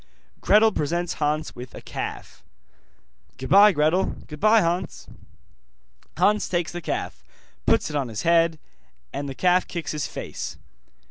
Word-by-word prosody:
Gretel 220 Hz, +1 st, +5 dB
presents 170 Hz, +1 st, -2 dB
Hans 150 Hz, +1 st, -1 dB
with 125 Hz, +1 st, -10 dB
a -, -, -7 dB
calf. -, -, -7 dB, 0.9 s
'Goodbye, 200 Hz, +11 st, +6 dB
Gretel.' 160 Hz, +3 st, +1 dB
'Goodbye, 215 Hz, +9 st, +3 dB
Hans.' 175 Hz, 0 st, -2 dB, 1.1 s
Hans 210 Hz, +1 st, +2 dB
takes 175 Hz, -2 st, -1 dB
the 175 Hz, -, -6 dB
calf, 65 Hz, -, -4 dB, 0.4 s
puts -, -, +2 dB
it -, -, -5 dB
on 140 Hz, -3 st, 0 dB
his 110 Hz, -3 st, -5 dB
head, 165 Hz, -1 st, +3 dB, 0.6 s
and 140 Hz, 0 st, -4 dB
the 135 Hz, -, -7 dB
calf 180 Hz, +3 st, +2 dB
kicks 170 Hz, -2 st, -4 dB
his 150 Hz, -1 st, -3 dB
face. -, -, -6 dB
170 Hz, 135 wpm, -24 LUFS, 150-185 Hz, 1.1 s, Goodbye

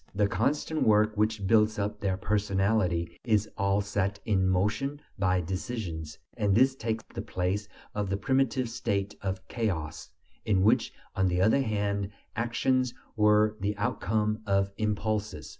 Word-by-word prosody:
The 100 Hz, 0 st, +3 dB
constant 145 Hz, +10 st, 0 dB
work 105 Hz, 0 st, +4 dB
which 105 Hz, -1 st, 0 dB
builds 110 Hz, +1 st, +4 dB
up 105 Hz, +1 st, -2 dB
their 95 Hz, -2 st, 0 dB
personality 100 Hz, -4 st, 0 dB
is 110 Hz, -3 st, +2 dB
all 100 Hz, 0 st, +1 dB
set 100 Hz, 0 st, -1 dB
in 95 Hz, -3 st, +2 dB
motion 105 Hz, +10 st, 0 dB, 0.2 s
by 95 Hz, -1 st, +2 dB
decisions; 85 Hz, -4 st, -4 dB, 0.2 s
and 105 Hz, -4 st, +2 dB
this 130 Hz, +4 st, +5 dB
takes 110 Hz, -3 st, -3 dB
the -, -, -3 dB
place 95 Hz, +3 st, -2 dB, 0.2 s
of 105 Hz, -2 st, -2 dB
the 100 Hz, -, 0 dB
primitive 130 Hz, 0 st, +1 dB
state 100 Hz, -3 st, -2 dB
of 95 Hz, -1 st, -4 dB
chaos, 90 Hz, -11 st, -3 dB, 0.3 s
in 95 Hz, -3 st, +2 dB
which, 105 Hz, -, +3 dB, 0.2 s
on 95 Hz, 0 st, +2 dB
the 90 Hz, 0 st, +1 dB
other 110 Hz, +8 st, +4 dB
hand, 100 Hz, -4 st, -1 dB, 0.3 s
actions 120 Hz, +2 st, +1 dB, 0.2 s
were 105 Hz, 0 st, +4 dB
the 105 Hz, +1 st, -1 dB
outcome 105 Hz, +1 st, 0 dB
of 100 Hz, 0 st, +2 dB
impulses. 105 Hz, -1 st, -2 dB
105 Hz, 145 wpm, -29 LUFS, 95-110 Hz, 0.3 s, this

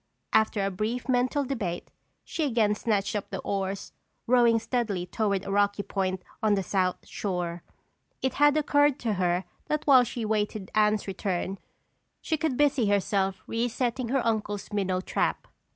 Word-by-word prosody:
After 220 Hz, -2 st, +3 dB
a 195 Hz, -, -1 dB
brief 215 Hz, +6 st, -3 dB
mental 255 Hz, +3 st, +2 dB
debate, 205 Hz, -10 st, -3 dB, 0.3 s
she 325 Hz, -, -3 dB
again 225 Hz, -7 st, +2 dB
snatched 210 Hz, -1 st, -1 dB
up 205 Hz, -, -3 dB
the -, -, -4 dB
oars, 195 Hz, 0 st, -3 dB, 0.3 s
rowing 240 Hz, -1 st, +5 dB
steadily 220 Hz, -6 st, -1 dB
toward 200 Hz, 0 st, -1 dB
a -, -, -4 dB
rocky 205 Hz, 0 st, +2 dB
point 185 Hz, -2 st, -2 dB, 0.2 s
on 215 Hz, -1 st, +3 dB
the 195 Hz, -, -1 dB
south 185 Hz, -1 st, 0 dB
shore. 175 Hz, -3 st, -3 dB, 0.6 s
It 260 Hz, -1 st, -1 dB
had 290 Hz, +1 st, +6 dB
occurred 290 Hz, -2 st, +3 dB
to 225 Hz, -3 st, 0 dB
her 180 Hz, +1 st, +1 dB, 0.2 s
that 300 Hz, 0 st, -1 dB
while 265 Hz, -3 st, +7 dB
she 240 Hz, 0 st, -4 dB
awaited 210 Hz, -2 st, -1 dB
Anne's 210 Hz, -1 st, +3 dB
return 190 Hz, 0 st, -2 dB, 0.6 s
she 320 Hz, -, -1 dB
could 310 Hz, -5 st, -1 dB
busy 280 Hz, -6 st, +3 dB
herself 195 Hz, -1 st, +1 dB
resetting 240 Hz, +1 st, -1 dB
her 265 Hz, -1 st, +1 dB
uncle's 210 Hz, -2 st, -2 dB
minnow 190 Hz, -2 st, 0 dB
trap. -, -, -1 dB
210 Hz, 155 wpm, -27 LUFS, 195-245 Hz, 0.6 s, while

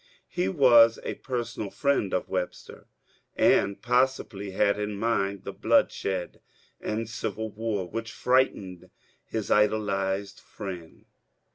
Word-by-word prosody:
He 95 Hz, -, -1 dB
was 115 Hz, 0 st, +6 dB
a -, -, -3 dB
personal 120 Hz, -5 st, -4 dB
friend 140 Hz, -7 st, 0 dB
of 90 Hz, -, -1 dB
Web 90 Hz, -1 st, -2 dB
ster, -, -, -14 dB, 0.5 s
and 100 Hz, 0 st, +3 dB
possibly 125 Hz, -5 st, 0 dB
had 100 Hz, +2 st, +1 dB
in 105 Hz, 0 st, -3 dB
mind 100 Hz, -3 st, -1 dB
the -, -, -6 dB
^^ -, -, -27 dB
bloodshed 95 Hz, -2 st, +1 dB, 0.4 s
and 110 Hz, +1 st, -3 dB
civil 110 Hz, -1 st, -4 dB
war," 105 Hz, -4 st, -3 dB
which 115 Hz, +3 st, -5 dB
frightened 100 Hz, -9 st, 0 dB, 0.3 s
his 110 Hz, -3 st, -4 dB
idolized 100 Hz, -2 st, +1 dB
friend. 90 Hz, -6 st, -9 dB
105 Hz, 125 wpm, -27 LUFS, 95-115 Hz, 0.5 s, was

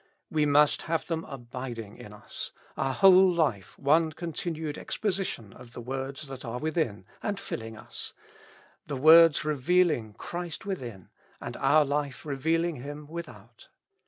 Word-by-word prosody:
We 150 Hz, -1 st, +2 dB
must 145 Hz, +1 st, +4 dB
have 165 Hz, -1 st, 0 dB
them 165 Hz, -1 st, -2 dB
abiding 120 Hz, -4 st, -7 dB
in 105 Hz, -, -10 dB
us: 105 Hz, -, -7 dB, 0.3 s
our 135 Hz, -, 0 dB
whole 190 Hz, +4 st, +7 dB
life 145 Hz, -, 0 dB
one 155 Hz, +3 st, +3 dB
continued 160 Hz, -2 st, -4 dB
exposition 190 Hz, -, -3 dB
of 120 Hz, -1 st, -14 dB
the -, -, -7 dB
words 135 Hz, +4 st, -5 dB
that 135 Hz, -1 st, -8 dB
are 120 Hz, -1 st, -4 dB
within, 150 Hz, -, -1 dB, 0.2 s
and 205 Hz, -1 st, -2 dB
filling 115 Hz, 0 st, -6 dB
us; -, -, -7 dB, 0.7 s
the 145 Hz, -2 st, -3 dB
words 160 Hz, +2 st, +7 dB
re 155 Hz, -, +1 dB
vealing 145 Hz, -, +2 dB
Christ 175 Hz, 0 st, -5 dB
within, 120 Hz, -, -5 dB, 0.3 s
and -, -, -6 dB
our 145 Hz, +3 st, +4 dB
life 145 Hz, -1 st, -2 dB
revealing 160 Hz, +4 st, 0 dB
Him 145 Hz, +4 st, -7 dB
without. 170 Hz, +3 st, -10 dB
145 Hz, 145 wpm, -28 LUFS, 125-165 Hz, 0.7 s, whole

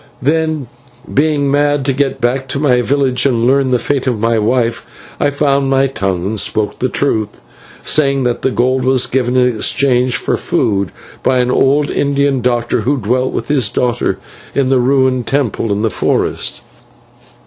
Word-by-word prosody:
"Then, 155 Hz, +1 st, 0 dB, 0.5 s
being 145 Hz, -1 st, +1 dB
mad 145 Hz, -1 st, +1 dB
to 135 Hz, -, +1 dB
get 135 Hz, 0 st, -1 dB
back 130 Hz, +2 st, -1 dB
to 135 Hz, -, -2 dB
my 130 Hz, -4 st, +2 dB
village 135 Hz, 0 st, +1 dB
and 120 Hz, -3 st, 0 dB
learn 135 Hz, +1 st, +2 dB
the 125 Hz, -, +2 dB
fate 135 Hz, +3 st, -2 dB
of 120 Hz, -4 st, 0 dB
my 115 Hz, +1 st, +1 dB
wife, 115 Hz, +1 st, 0 dB, 0.4 s
I -, -, +2 dB
found 140 Hz, -1 st, +1 dB
my 135 Hz, 0 st, +3 dB
tongue 95 Hz, -9 st, -2 dB
and 105 Hz, +2 st, -2 dB
spoke 105 Hz, +3 st, -1 dB
the 130 Hz, -, 0 dB
truth, 110 Hz, -7 st, -1 dB, 0.4 s
saying 140 Hz, -3 st, +2 dB
that 120 Hz, -1 st, -1 dB
the -, -, +1 dB
gold 130 Hz, +1 st, 0 dB
was 130 Hz, -1 st, +3 dB
given 125 Hz, -1 st, 0 dB
in 125 Hz, -2 st, +2 dB
exchange 125 Hz, +1 st, +1 dB
for -, -, -1 dB
food 100 Hz, -5 st, -1 dB, 0.3 s
by 130 Hz, -, +1 dB
an 125 Hz, 0 st, +1 dB
old 145 Hz, +3 st, +2 dB
Indian 140 Hz, -2 st, 0 dB
doctor, 120 Hz, -1 st, 0 dB
who 140 Hz, +3 st, 0 dB
dwelt 125 Hz, +3 st, 0 dB
with -, -, -4 dB
his 140 Hz, -4 st, +2 dB
daughter 120 Hz, -1 st, -1 dB, 0.4 s
in 135 Hz, -1 st, +2 dB
a 130 Hz, -, +3 dB
ruined 130 Hz, -1 st, +1 dB
temple 125 Hz, -6 st, -1 dB
in 100 Hz, +2 st, -1 dB
the 110 Hz, -, 0 dB
forest. 90 Hz, -, -1 dB
130 Hz, 175 wpm, -15 LUFS, 120-140 Hz, 0.5 s, my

